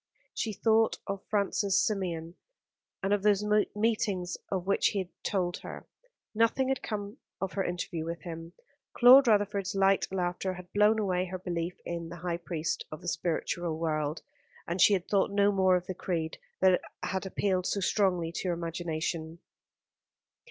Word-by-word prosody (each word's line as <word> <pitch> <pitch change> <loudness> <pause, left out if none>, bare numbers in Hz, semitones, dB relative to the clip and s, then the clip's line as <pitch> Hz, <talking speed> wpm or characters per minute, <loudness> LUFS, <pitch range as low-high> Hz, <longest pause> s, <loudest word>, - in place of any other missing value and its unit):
She 225 - -2
thought 220 +2 +2
of 195 -1 -4
Francis 200 -1 +1
Symeon, 175 -5 -3 0.7
and 195 +1 +2
of 205 - +1
those 210 0 +3 0.3
meetings 210 -4 0 0.2
of 185 -2 -1
which 200 +1 +3
he - - -1
had 185 -2 -2
told 180 -3 -1
her. - - -9 0.5
Nothing 230 +4 +2
had 270 - 0
come 205 +1 -5 0.2
of 190 0 -3
her 195 - 0
interview 175 -2 -3
with 170 +1 -5
him. 165 0 -7 0.4
Claude 255 +2 +9
Rutherford's 205 -3 +2
light 195 0 +3
laughter 185 0 -2
had 180 0 -12
blown 210 +2 +4
away 185 -4 0
her 185 0 -5
belief 175 -1 -3
in 170 -1 -4
the 170 - -7
high 170 -1 0
priest 170 -2 -3
of 155 - -7
the - - -9
spiritual 170 -1 -1
world; 155 -1 -2 0.4
and 170 +2 -1
she 210 - +7
had 185 -2 0
thought 200 -2 +2
no 200 0 +3
more 190 -2 +4
of 180 0 -1
the 185 - -4
creed 165 -3 -3 0.2
that 185 -1 +5 0.2
had 190 0 -2
appealed 185 -1 0
so 200 - 0
strongly 185 -4 +1
to 180 - -4
her 175 - +1
imagination. 165 -1 -3
185 Hz, 165 wpm, -30 LUFS, 170-200 Hz, 0.7 s, Claude